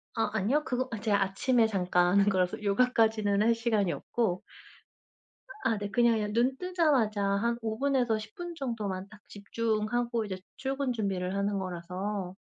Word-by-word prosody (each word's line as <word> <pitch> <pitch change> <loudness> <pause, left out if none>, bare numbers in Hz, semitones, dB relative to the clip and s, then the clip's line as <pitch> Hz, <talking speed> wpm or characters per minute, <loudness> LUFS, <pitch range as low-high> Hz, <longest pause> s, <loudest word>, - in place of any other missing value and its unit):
아 225 - +1
아니요. 225 +9 +1
그거 255 +1 -1
아 225 - -4
제가 205 -2 +1
아침에 225 +4 +2
잠깐 180 -3 +2
하는 200 +1 +4
거라서 185 +1 0
요가까지는 215 -1 +2
할 230 +1 +4
시간이 220 -5 +1
없고 200 -7 -1 1.2
아 225 - +2
네 205 0 -4
그냥 235 -2 +4
예 210 - -1
눈뜨자마자 260 - +1
한 200 +4 +1
5 220 -1 -3
분에서 255 -5 +1
10 215 0 -10
분 350 -1 -6
정도만 210 -8 -4
딱 215 0 -15
집중하고 225 +2 -1
이제 190 -2 -5 0.2
출근 270 -1 -2
준비를 195 -4 -2
하는 200 0 0
거라서 185 +1 -4
215 Hz, 310 characters per minute, -29 LUFS, 200-240 Hz, 1.2 s, 하는